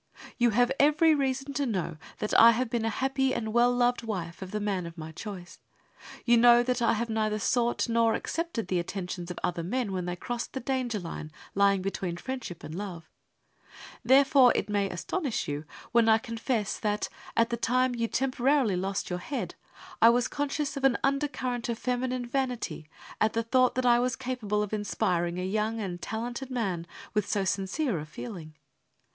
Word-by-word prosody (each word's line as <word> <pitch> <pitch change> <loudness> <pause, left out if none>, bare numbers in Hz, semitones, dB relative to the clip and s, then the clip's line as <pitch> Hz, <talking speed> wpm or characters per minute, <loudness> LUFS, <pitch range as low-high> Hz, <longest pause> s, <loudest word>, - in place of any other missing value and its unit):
You 240 0 +5
have 245 +3 +3
every 305 +2 +5
reason 270 -1 -1
to 280 -1 0
know 180 -7 -2 0.2
that 210 - -3
I 230 0 +8
have 240 0 -1
been 235 -2 0
a - - +1
happy 265 +3 0
and 220 -2 -3
well 240 +1 +5
loved 245 0 +2
wife 185 -7 -5
of 190 - -6
the 210 - -3
man 195 -4 -1
of 170 +1 -11
my 160 0 -7
choice. 180 0 -8 0.7
You 240 -1 +5
know 240 0 +7
that 250 0 -1
I 230 - +3
have 230 +2 -1
neither 215 -1 0
sought 240 +3 +1
nor 230 -1 +3
accepted 330 - -3
the 185 -1 +1
attentions 180 0 -5
of 180 - -6
other 175 -1 -1
men 210 +5 -2
when 185 -2 -2
they 175 0 -3
crossed 240 +6 -5
the 265 - -3
danger 255 -3 -1
line 165 -3 -7 0.2
lying 200 -1 +3
between 185 -3 -3
friendship 250 -5 -6
and 155 - -7
love. 175 -3 -7 0.9
Therefore 270 -1 +6
it - - -1
may 200 -1 +1
astonish 240 - -2
you 145 +1 -4 0.3
when 235 -1 +4
I 220 - +7
confess 230 -2 -2
that, 210 -1 -1 0.3
at 230 +1 +3
the - - +1
time 250 +2 +1
you 230 -1 -1
temporarily 260 -3 +1
lost 195 +1 -2
your 180 - -2
head, 275 +10 -4 0.5
I 230 - +9
was 240 +1 +3
conscious 290 0 -2
of 275 - -5
an 270 -3 +4
undercurrent 270 -4 -1
of 230 - -1
feminine 250 0 -1
vanity 245 - -3 0.3
at 220 - +3
the 230 - 0
thought 255 +2 +3
that 255 0 0
I 240 -1 +5
was 250 +1 0
capable 235 -5 -2
of 210 - -6
inspiring 180 -4 0
a 180 - -2
young 215 +3 -1
and 180 -4 -4
talented 240 +4 -4
man 195 -10 -2 0.3
with 210 -2 0
so 200 -2 0
sincere 195 - -1
a 150 - -7
feeling. 160 -3 -8
230 Hz, 190 wpm, -28 LUFS, 195-255 Hz, 0.9 s, I